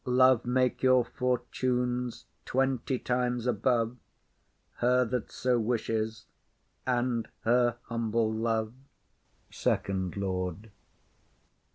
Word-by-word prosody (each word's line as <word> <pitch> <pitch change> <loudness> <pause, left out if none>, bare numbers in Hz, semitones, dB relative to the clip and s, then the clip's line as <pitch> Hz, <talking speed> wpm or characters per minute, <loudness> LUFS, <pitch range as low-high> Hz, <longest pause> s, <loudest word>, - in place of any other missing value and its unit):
Love 130 -1 +4
make 125 0 +1
your 130 -2 +5
fortunes 125 0 -1 0.2
twenty 130 0 0
times 125 -1 -1
above 120 0 +1 0.8
Her 125 +1 +3
that 125 -1 -3
so 125 -1 +1
wishes, 110 -1 -1 0.6
and 120 -2 0
her 120 0 +3
humble 115 -1 0
love! 110 0 -1 0.8
SECOND 95 -1 -1
LORD. 95 +1 -3
120 Hz, 85 wpm, -29 LUFS, 110-125 Hz, 0.8 s, your